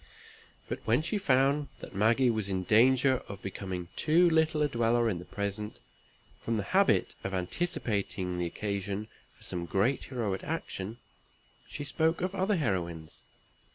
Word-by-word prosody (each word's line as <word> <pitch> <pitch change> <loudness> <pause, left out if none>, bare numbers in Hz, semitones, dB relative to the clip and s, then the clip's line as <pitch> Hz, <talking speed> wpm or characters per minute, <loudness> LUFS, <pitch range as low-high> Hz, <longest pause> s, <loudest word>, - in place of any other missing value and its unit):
But - - -3
when 120 +7 +2
she 205 +5 -1
found 140 -2 +3
that - - -10
Maggie 115 +5 +3
was 110 -3 -2
in 95 -1 -1
danger 130 +6 +4
of 100 -1 -8
becoming 95 -2 -5
too 170 +3 +4
little 160 -1 +3
a - - +3
dweller 120 -2 +2
in 95 -6 -1
the 90 - -9
present, 100 +2 -4 0.6
from 115 -1 0
the 105 - -1
habit - - +3
of 95 0 -2
anticipating 95 - -2
the 85 - 0
occasion 100 +2 -3 0.3
for - - -18
some 85 -1 -4
great 105 - +1
heroic 110 -7 -2
action, 115 -9 -4 0.7
she 145 - -5
spoke 160 +3 +1
of 185 +1 -1
other 195 +2 +1
heroines. 85 - -2
110 Hz, 155 wpm, -30 LUFS, 95-145 Hz, 0.7 s, danger